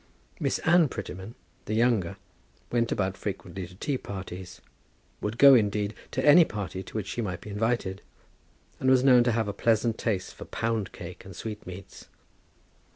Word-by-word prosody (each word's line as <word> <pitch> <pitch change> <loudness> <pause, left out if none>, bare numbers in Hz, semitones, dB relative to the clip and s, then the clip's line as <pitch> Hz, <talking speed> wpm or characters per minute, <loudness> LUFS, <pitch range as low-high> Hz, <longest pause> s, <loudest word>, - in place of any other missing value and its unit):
Miss - - 0
Anne 170 -1 +6
Prettyman, 100 0 -7 0.3
the 110 - -2
younger, 110 -6 +2 0.5
went 115 -1 +1
about 95 -1 0
frequently 95 -2 -5
to 90 - -15
tea 135 +6 -2
parties, 95 -2 -7 0.6
would 105 +2 -3
go, 140 +1 +9
indeed, 105 -3 +2 0.2
to - - -2
any 150 +4 +9
party 100 - -5
to 95 - -12
which 110 -3 -2
she 120 - -3
might 95 -5 -3
be 105 - -9
invited; 105 -2 -1 0.8
and 130 - +2
was 130 -1 +5
known 125 -3 +7
to 120 - +2
have 115 -1 0
a 100 - -2
pleasant 115 +1 +1
taste 100 -5 -2
for - - -10
pound 115 -3 -2
cake 90 0 -9
and 95 -2 -11
sweet 105 -3 -7
meats. 90 0 -10
105 Hz, 170 wpm, -27 LUFS, 95-120 Hz, 0.8 s, go